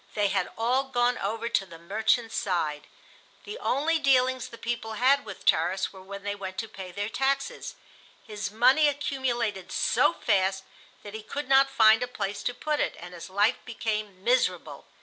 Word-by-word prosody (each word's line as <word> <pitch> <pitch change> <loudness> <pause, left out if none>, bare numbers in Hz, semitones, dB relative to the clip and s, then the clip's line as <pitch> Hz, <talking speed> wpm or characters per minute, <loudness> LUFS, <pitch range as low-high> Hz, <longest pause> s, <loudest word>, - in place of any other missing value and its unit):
They 205 -1 +2
had 190 -2 0
all 250 +4 +1
gone 245 -2 +1
over 225 +3 -2
to 230 -4 +1
the 170 -3 -12
"merchant's" 220 +6 0
side. 155 -6 -1 0.6
The 420 +4 -7
only 315 +5 +1
dealings 260 -3 +2
the 230 - -11
people 230 -1 -4
had 270 +5 +3
with - - -10
Tarras 180 +5 +2
were 190 - -12
when 200 +1 -9
they 205 0 -2
went 190 -2 -7
to 225 - -3
pay 190 -3 -9
their 205 +3 -3
taxes. 275 - -2 0.5
His 210 -2 -5
money 255 +8 +4
accumulated 240 -9 -2
so - - +2
fast 190 -1 +1 0.4
that 205 - -9
he 220 - -6
could 280 +6 -5
not 270 0 +5
find 225 -3 +5
a 245 - -1
place 205 -4 -4
to - - -6
put 300 +1 -2
it, - - 0
and 175 +1 -10
his 175 +1 -9
life 205 +5 +2
became 210 -4 -4
miserable. 250 +3 0
220 Hz, 180 wpm, -27 LUFS, 195-260 Hz, 0.6 s, not